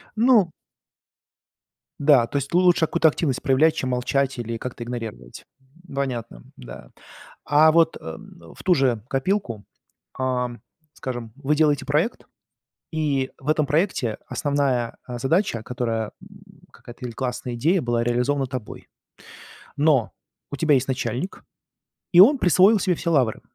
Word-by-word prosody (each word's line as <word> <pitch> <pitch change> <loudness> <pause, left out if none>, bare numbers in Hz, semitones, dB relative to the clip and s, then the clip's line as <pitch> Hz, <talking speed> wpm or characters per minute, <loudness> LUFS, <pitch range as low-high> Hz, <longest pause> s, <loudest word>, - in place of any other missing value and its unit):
Ну. 220 -6 +4 1.5
Да, 140 -5 +4
то 140 - -3
есть 140 +2 -4
лучше 180 -1 +4
какую-то 160 0 +3
активность 145 -4 0
проявлять, 145 +4 +3
чем 130 - -2
молчать 135 +2 0
или 115 -1 -4
как-то 120 0 -6
игнорировать. 115 - -7 0.5
Понятно, 120 - -4
да. - - -11 0.5
А 155 +2 +5
вот, 165 0 +3
э, - - -25
м, 80 +1 -11
в - - -13
ту 180 - +4
же 125 -7 +1
копилку, 135 - -2 0.5
ам, 125 -2 -2 0.3
скажем, 120 -4 -6
вы 145 +1 0
делаете 145 -3 +2
проект, 150 - -1 0.7
и 145 -4 -1
в 135 - -10
этом 155 -1 +2
проекте 150 - 0
основная, 140 -5 -1
а, 120 -1 -6
задача, 135 - 0
которая, 115 -3 -3
м, - - -17
какая-то 120 +1 -12
или 120 - -7
классная 125 0 -4
идея 160 +9 +1
была 120 -1 0
реализована 125 +3 0
тобой. 125 -4 -8 0.9
Но 145 -5 +2 0.4
у 140 - -5
тебя 150 0 +3
есть 130 0 +1
начальник, 125 - -3 0.7
и 175 - +5
он 270 +9 +8
присвоил 190 - +4
себе 185 -2 +1
все 170 - -2
лавры. 125 -8 +1
135 Hz, 140 wpm, -23 LUFS, 120-155 Hz, 1.5 s, он